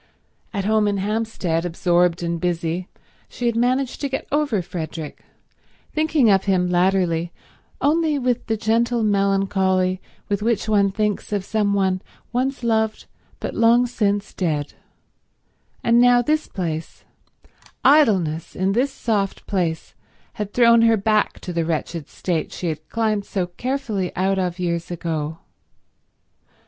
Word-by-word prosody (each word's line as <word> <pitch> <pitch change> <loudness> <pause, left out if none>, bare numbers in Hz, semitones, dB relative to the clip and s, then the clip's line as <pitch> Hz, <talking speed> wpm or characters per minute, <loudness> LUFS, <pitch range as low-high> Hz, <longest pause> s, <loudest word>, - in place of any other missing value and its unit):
At 200 -2 -3
home 215 0 +3
in 200 -1 0
Hampstead, 200 -5 -1
absorbed 175 0 +1
and 170 -1 -2
busy, 175 0 -1 0.4
she 245 - -5
had 235 -1 +1
managed 250 +2 0
to 280 - -1
get 265 - -3
over 280 -10 +1
Frederick, 160 -3 -6 0.7
thinking 310 -4 +2
of 195 -1 +3
him 180 -2 +1
latterly 175 -2 +1 0.5
only 310 0 +2
with 250 -2 -1
the 220 -1 0
gentle 230 +2 +1
melancholy 195 -2 +1 0.3
with 200 0 -1
which 220 -1 0
one 200 -2 +3
thinks 210 +1 -2
of 200 -2 -1
some 205 -2 +1
one 190 -2 +1 0.3
once 260 +1 -1
loved 220 -2 0 0.3
but - - -4
long 235 +2 +4
since 205 -4 -1
dead; 155 -5 -2 1.1
and 235 +1 +4
now 245 0 +5
this 310 +3 0
place, 165 -4 -5 0.8
idleness 190 - +3
in 190 +1 +1
this 250 +7 +1
soft 205 -6 -2
place, 170 -5 -2 0.4
had 210 -2 -5
thrown 235 0 +5
her 225 -1 +5
back 215 +1 +1
to 180 - -5
the 170 -1 0
wretched 160 -1 -3
state 170 -4 -2
she 175 - -3
had 155 0 -6
climbed 215 -3 0
so 190 -2 -2
carefully 215 -1 -3
out 190 +1 +1
of 180 -1 -1
years 170 -2 -2
ago. 160 -2 -3
200 Hz, 140 wpm, -22 LUFS, 175-230 Hz, 1.1 s, now